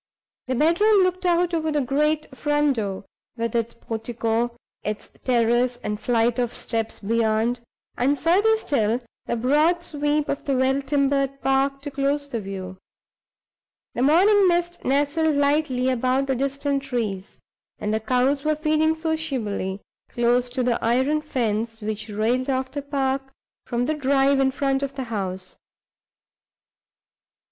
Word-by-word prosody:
The 255 - -1
bedroom 375 - +4
looked 365 0 0
out 350 0 +2
over 315 -1 0
the 300 - +1
great 295 +2 0
front 295 -1 +1
door, 200 -3 -3 0.3
with 230 0 -2
its 230 0 -1
portico, 230 +1 -2 0.3
its 210 0 -5
terrace 240 0 +2
and 210 0 -3
flight 235 +1 +1
of 245 -1 -1
steps 225 -1 -3
beyond, 225 +2 +1 0.4
and, 275 +4 +2
further 385 +10 +3
still, 240 - 0 0.3
the - - 0
broad 300 +9 +2
sweep 295 -2 -1
of - - -3
the 275 - +1
well 265 +2 +2
timbered 275 -1 0
park 275 +1 +1
to 290 - -5
close 285 +1 -1
the 235 -5 -4
view. 190 -1 -7 1.2
The - - -2
morning 380 +8 +5
mist 345 0 0
nestled 290 +3 +1
lightly 280 -3 +1
about 255 +2 +1
the 270 -1 0
distant 275 +1 -1
trees; 215 -7 -4 0.4
and 210 - -2
the 220 - +1
cows 255 +5 +1
were 310 0 +1
feeding 310 +1 +2
sociably, 270 - -2 0.3
close 245 +1 +1
to 255 +1 -2
the 240 -1 0
iron 260 +6 +2
fence 225 -6 -2
which 215 0 -4
railed 230 +5 0
off 260 0 -1
the 285 - -4
park 275 -1 -1 0.5
from 240 0 0
the 310 - 0
drive 275 -1 +2
in 270 0 +3
front 270 0 0
of 275 -1 -4
the 270 - -3
house. 185 -2 -4
270 Hz, 145 wpm, -23 LUFS, 235-295 Hz, 1.2 s, morning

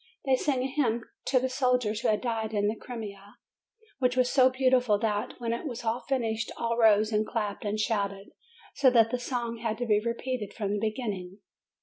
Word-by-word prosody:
They 265 -1 +4
sang 260 -1 0
a - - 0
hymn 245 -5 0 0.2
to 255 0 +3
the 260 - 0
soldiers 250 -4 +1
who - - 0
had 210 -1 +2
died 225 -3 -2
in 205 0 +2
the 215 - 0
Crimea, 205 -4 -8 0.6
which 250 -1 +1
was 250 -1 +3
so 260 -2 +6
beautiful 255 -4 +3
that, 210 -1 -1
when 230 -1 -1
it 235 +7 -4
was 240 -3 -6 0.2
finished, 230 -4 -1
all 230 0 -1
rose 215 -2 +4
and 215 0 +2
clapped 210 -2 -3
and 210 +1 -1
shouted, 200 -2 -1 0.4
so 275 -2 +5
that 230 -2 +4
the 250 - -1
song 240 -2 -3
had 225 -1 -2
to 245 - -2
be 210 -2 +3
repeated 235 -2 -3
from 205 -3 -2
the 210 - 0
beginning. 205 -4 -3
230 Hz, 200 wpm, -28 LUFS, 210-250 Hz, 0.6 s, so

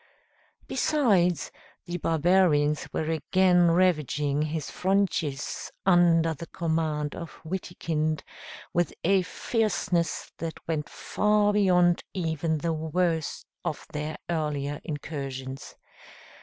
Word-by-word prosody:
Besides, 190 - +2 0.3
the 175 -1 -3
barbarians 160 -3 +3
were 160 0 -1
again 180 +2 +4
ravaging 150 -5 +2
his 155 0 -2
frontiers, 180 -7 -1 0.2
under 170 -3 +5
the 165 +3 -8
command 160 -3 -1
of 170 -2 -8
Witikind, 155 -4 -2 0.5
with 175 0 +1
a 190 +2 +4
fierceness 180 -4 -1
that 165 0 -4
went 155 -2 -2
far 210 0 +1
beyond 180 -4 +4
even 160 -2 0
the 165 +2 -1
worst 160 0 -1 0.2
of - - -3
their 150 +1 -3
earlier 150 -4 -2
incursions. 135 -4 -6
165 Hz, 100 wpm, -27 LUFS, 150-180 Hz, 0.5 s, under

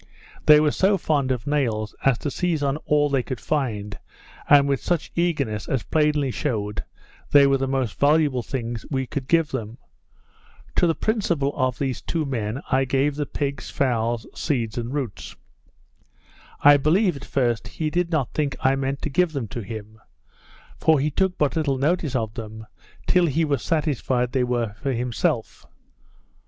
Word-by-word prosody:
They 150 0 +9
were 150 -1 +3
so 195 +5 +2
fond 145 -6 0
of 125 -3 -2
nails, 115 -8 -1
as 135 -3 +3
to 145 - -4
seize 170 -1 -1
on 140 +1 0
all 150 0 +3
they 140 -2 +1
could 130 -1 -5
find, 110 -9 -2 0.5
and 140 -1 +7
with 140 -1 0
such 175 -3 -1
eagerness, 140 - -1
as 130 -4 0
plainly 150 -3 +1
shewed 105 -7 -2 0.5
they 145 -1 +7
were 135 -1 +3
the 135 - -1
most 130 -5 -2
valuable 145 -3 +3
things 120 -2 -4
we 130 -2 -1
could 130 +1 -5
give 165 -1 +3
them. 115 -3 -5 1.0
To 175 - +4
the 165 - +1
principal 170 -11 0
of 130 -2 0
these 135 -3 -2
two 160 -2 -2
men 120 -2 -3
I 135 0 +3
gave 135 +2 +1
the 145 0 -3
pigs, 140 -1 -3
fowls, 120 -3 0
seeds, 120 -8 -2
and 120 0 -3
roots. 135 -9 -5 1.3
I 145 0 +8
believe, 175 +5 +2
at 140 - -9
first, 120 -4 0
he 155 +6 -3
did 175 0 0
not 155 -7 -1
think 145 -3 -1
I 135 +1 +2
meant 135 0 -3
to - - -1
give 175 +2 +2
them 135 -6 -3
to 120 - -5
him; 110 +1 -8 0.8
for 160 -2 +4
he 150 +3 0
took 190 +4 0
but 145 -2 +1
little 145 -4 0
notice 150 0 0
of 110 -3 -1
them, 110 -1 -8 0.4
till 180 -2 +3
he 160 +2 +1
was 140 -5 0
satisfied 135 -6 0
they 130 -1 +1
were 120 -4 -1
for 135 +5 -3
himself. 120 -1 -2
135 Hz, 175 wpm, -23 LUFS, 120-150 Hz, 1.3 s, They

